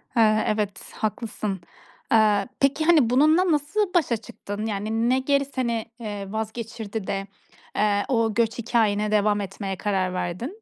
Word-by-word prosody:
He, - - +2 0.3
evet, 210 -2 -2
haklısın. 215 -3 -3 0.5
Eee, 210 -3 +4
peki, 280 +3 +2
hani, 310 -8 +5
bununla 310 +8 +4
nasıl 355 +7 0
başa 300 -10 +2
çıktın? 215 -2 -7
Yani, 220 +2 -1
ne 260 +1 +3
geri 280 +1 +2
seni, 235 -5 -2
eee, 205 -3 -5
vazgeçirdi 220 -1 -5
de, 195 0 -2 0.5
eee, 205 -1 +2
o 230 -4 +1
göç 230 +1 +1
hikâyene 215 -3 +1
devam 210 0 +2
etmeye 195 0 -4
karar 190 -3 0
verdin? 205 - -4
220 Hz, 140 wpm, -24 LUFS, 205-255 Hz, 0.5 s, hani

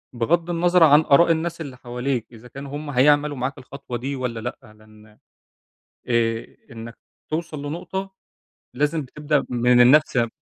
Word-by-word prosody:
بغَض 165 +9 0
النظَر 175 +1 +3
عن 150 0 +7
آراء 165 +3 +4
الناس 165 +1 -2
اللي 135 -5 -8
حواليك، 125 0 -3
إذا 115 +1 -14
كانوا 140 +3 -9
هُم 150 -1 -7
هيعملوا 145 +2 +3
معاك 130 +2 -3
الخطوة 130 -1 -8
دي 135 +4 -4
والّا 125 -3 -4
لأ، 110 -2 -8
لإن 110 0 -20 0.9
آآ 115 -1 -1 0.2
إنّك 115 0 -10 0.3
توصل 155 -2 -4
لنقطة، 190 +5 -5 0.6
لازم 150 +3 -1
تبدأ 150 +2 -1
من 125 0 +3
النفْس 135 +3 +5
ي 115 -1 +2
135 Hz, 150 wpm, -22 LUFS, 120-155 Hz, 0.9 s, عن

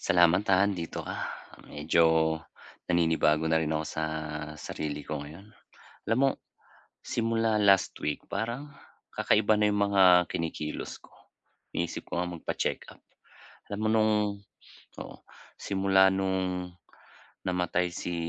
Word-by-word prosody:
Salamat, 90 +1 +3
ha, 95 0 +5
andito 90 -5 -3
ka. - - -5 0.5
Medyo 80 +3 +2 0.8
naninibago 80 -2 +2
na 80 0 +2
rin 80 -1 -1
ako 80 0 -1
sa 80 - -3 0.5
sarili 75 -1 -5
ko 75 0 -4
ngayon. 85 +9 -11 0.6
Alam 115 - +2
mo, 135 +1 +4 0.7
simula 115 -1 0
last 100 -2 +4
week 75 - -1
parang 120 +6 -3 0.5
kakaiba 110 0 +3
na 105 0 +2
yung 100 0 +1
mga 90 -3 +6
kinikilos 80 -2 -4
ko. - - -21 0.6
Iniisip 85 0 -3
ko - - -3
ngang 90 -1 -3
magpacheck-up. - - -3 0.7
Alam 100 0 -4
mo 110 - +1
nung 110 -1 +3 0.9
oo, - - -8 0.4
simula 95 -1 +3
nung 95 -2 -2 0.7
namatay 90 -1 0
si 90 - -4
90 Hz, 120 wpm, -28 LUFS, 80-100 Hz, 0.9 s, mga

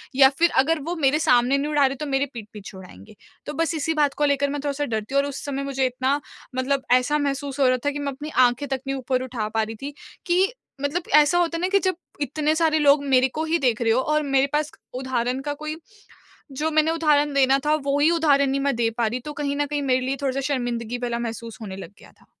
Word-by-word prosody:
या 265 0 +7
फिर 340 0 +5
अगर 325 +3 0
वो 350 - -2
मेरे 290 +3 +3
सामने 250 +2 +4
नहीं 290 +2 -2
उड़ा 290 -2 +4
रहे 270 0 0
तो 300 +3 -5
मेरे 275 0 0
पीठ 225 -3 -8
पीछे 205 -2 -10
उड़ाएँगे 180 - -13 0.3
तो 295 - -5
बस 330 0 0
इसी 320 +1 -1
बात 285 -2 +2
को 295 - 0
लेकर 280 0 +1
मैं 285 - -5
थोड़ा-सा 290 0 -1
डरती 220 +1 -4
हूँ 280 - +5
और 285 - -3
उस 275 - -7
समय 275 -1 -3
मुझे 270 -1 -1
इतना 255 +3 0 0.4
मतलब 265 +1 -1
ऐसा 255 +4 +3
महसूस 280 -1 -3
हो 270 - +4
रहा 255 0 +3
था 290 - +2
कि 290 - -5
मैं 280 -1 -2
अपनी 295 +3 -7 0.2
आँखें 245 +4 -3
तक 270 -1 -2
नहीं 275 - -1
ऊपर 255 0 -1
उठा 240 -4 -4
पा 220 0 0
रही 220 +1 -6
थी 285 +1 -5 0.3
कि 370 +5 +2 0.3
मतलब 300 +5 -1
ऐसा 300 +3 +5
होता 335 -1 +1
है 330 - -5
ना 365 - +1
कि 395 +1 +3
जब 375 -1 0 0.3
इतने 300 +2 0
सारे 315 -1 +2
लोग 285 -1 +4
मेरे 260 -1 +4
को 315 - -1
ही 330 +1 +1
देख 245 -4 +1
रहे 225 - +2
हो 240 - +3
और 305 0 +2
मेरे 275 -1 +2
पास 300 0 0 0.2
उदाहरण 255 -1 -2
का 290 +1 -3
कोई 305 0 -4 0.9
जो 315 - 0
मैंने 310 +1 +3
उदाहरण 300 -3 +2
देना 270 0 +4
था 300 +1 +3
वो 280 0 +1
ही 300 - +4
उदाहरण 290 -4 +3
नहीं 275 - 0
मैं 280 -2 0
दे 230 -1 +1
पा 235 -2 +2
रही 240 +3 -2
तो 300 - -5
कहीं 285 -1 -2
न 290 - +1
कहीं 290 0 -3
मेरे 260 -2 +1
लिए 270 - -1
थोड़ा-सा 275 -1 -1
शर्मिंदगी 240 -2 -3
वाला 235 -1 -2
महसूस 230 -1 -6
होने 195 -3 -6
लग 195 - -9
गया - - -16
था। - - -23
275 Hz, 255 wpm, -23 LUFS, 255-295 Hz, 0.9 s, या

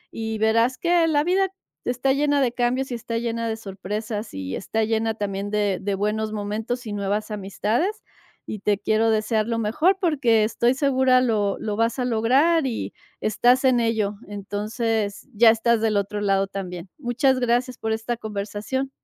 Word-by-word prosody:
y 220 -1 -3
verás 230 +4 +2
que 345 -1 +3
la 295 -2 +2
vida 380 +3 +2 0.4
está 250 +2 +1
llena 290 +1 +2
de 260 -3 +2
cambios 250 +2 -1
y - - -2
está 230 0 -4
llena 230 0 -2
de 220 - -1
sorpresas 210 +2 -5
y 95 -1 -4
está 220 +3 -1
llena 225 0 0
también 200 -1 -3
de 205 -3 0
de 200 0 -1
buenos 215 +2 -1
momentos 220 +4 -3
y 210 - -4
nuevas 205 +2 -2
amistades 215 - -1 0.4
y 215 - -5
te 205 0 +1
quiero 220 +3 +1
desear 215 0 +1
lo 230 - -1
mejor 300 - +2
porque 265 - +3
estoy 235 +3 +2
segura 260 -2 +3
lo 210 -5 +1
lo 210 -1 -3
vas 230 +3 +1
a 250 - 0
lograr 265 +7 +3
y 235 - -4 0.3
estás 245 +5 +3
en 255 -2 +4
ello. 220 -3 0
Entonces, 205 +2 -3
ya 225 +2 +6
estás 230 +1 +3
del 220 -1 +1
otro 200 +1 -2
lado 195 -1 +2
también. 185 -2 -6
Muchas 260 +1 +1
gracias 245 +1 0
por 220 0 -2
esta 225 +2 -3
conversación. 215 +5 -4
225 Hz, 175 wpm, -23 LUFS, 210-250 Hz, 0.4 s, ya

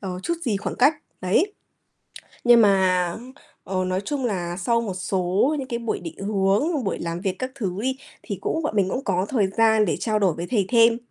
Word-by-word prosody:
ờ, 185 -2 -5
chút 340 - -1
gì 215 -5 +1
khoảng 185 -5 -4
cách, 285 +5 +5 0.3
đấy. 260 - +1 0.9
Nhưng 240 -1 +7
mà, 185 -3 +3 0.5
ờ, 185 0 -2
nói 185 +1 -1
chung 270 +4 -3
là 175 -6 -2
sau 230 +5 +1
một 205 -5 -3
số 190 +9 0
những 260 - -5
cái 235 -3 -3
buổi 230 -2 -2
định 165 -2 -8
hướng, 205 - +1
buổi 195 - -2
làm 170 0 -3
việc 190 -2 -1
các 255 0 -3
thứ 200 -9 -2
đi, 260 +1 -1 0.3
thì 200 -4 -5
cũng 320 - -1
bọn 295 - -2
mình 195 -3 +2
cũng 255 +7 -3
có 185 -1 0
thời 215 -7 +2
gian 220 +2 +3
để - - -1
trao 215 -2 0
đổi 190 -4 +2
với 170 +3 -5
thầy 205 -5 +2
thêm. 230 -1 +5
200 Hz, 215 wpm, -23 LUFS, 185-240 Hz, 0.9 s, Nhưng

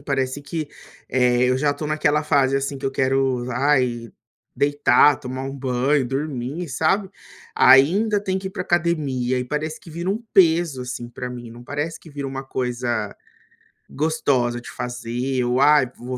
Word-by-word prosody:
parece 135 -1 -2
que, 155 0 -4 0.4
eh, 125 -1 +2
eu 130 +1 +2
já 145 +1 +1
tô 150 - -5
naquela 150 0 +1
fase 135 -2 +2
assim 135 0 -3
que 135 - -3
eu 135 - 0
quero, 130 -2 0
ai, 125 -3 +1 0.5
deitar, 145 0 +4
tomar 130 0 -5
um 135 - -5
banho, 130 +1 +1
dormir, 140 +4 -4
sabe. 190 +8 0 0.4
Ainda 195 +11 +5
tem 190 -1 -1
que 190 - -7
ir - - -10
pra 185 -1 -4
academia, 145 -8 0
e 125 - -2
parece 155 +4 -3
que 165 - -13
vira 170 +3 -4
um 220 +4 -2
peso, 165 -7 +3
assim, 125 -1 -6
pra 125 +1 -6
mim, 120 -2 -8
não 120 +1 -12
parece 145 +5 -4
que - - -15
vira 140 -1 -5
uma 135 0 -5
coisa 120 -5 -2 0.8
gostosa 135 -5 0
de - - -10
fazer 125 +2 -3
ou 125 +2 +1
ai 145 -3 +5
vou 125 +1 -5
135 Hz, 170 wpm, -22 LUFS, 125-150 Hz, 0.8 s, Ainda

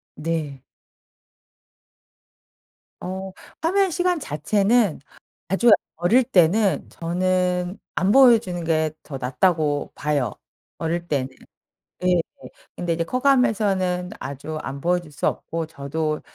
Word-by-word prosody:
네. 150 -4 -3 2.4
어 190 +1 -5 0.3
화면 380 +3 +2
시간 355 0 +1
자체는 200 - +1 0.5
아주 195 +6 +3 0.3
어릴 210 +10 +4
때는 200 -2 +2
저는 180 +1 -1 0.2
안 190 - +2
보여주는 225 -9 +5
게 160 -1 +1
더 140 -3 -7
낫다고 145 +3 0
봐요 145 -7 -1 0.4
어릴 170 +1 -2
때는. 135 -4 -1 0.8
예. 180 -1 +4 0.6
근데 175 -1 -1
이제 165 0 -1
커가면서는 200 -7 +1
아주 140 +3 -6
안 135 +1 -6
보여줄 175 -2 0
수 145 - -4
없고 165 -1 -3
저도 155 +1 -3
175 Hz, 200 characters per minute, -23 LUFS, 155-200 Hz, 2.4 s, 보여주는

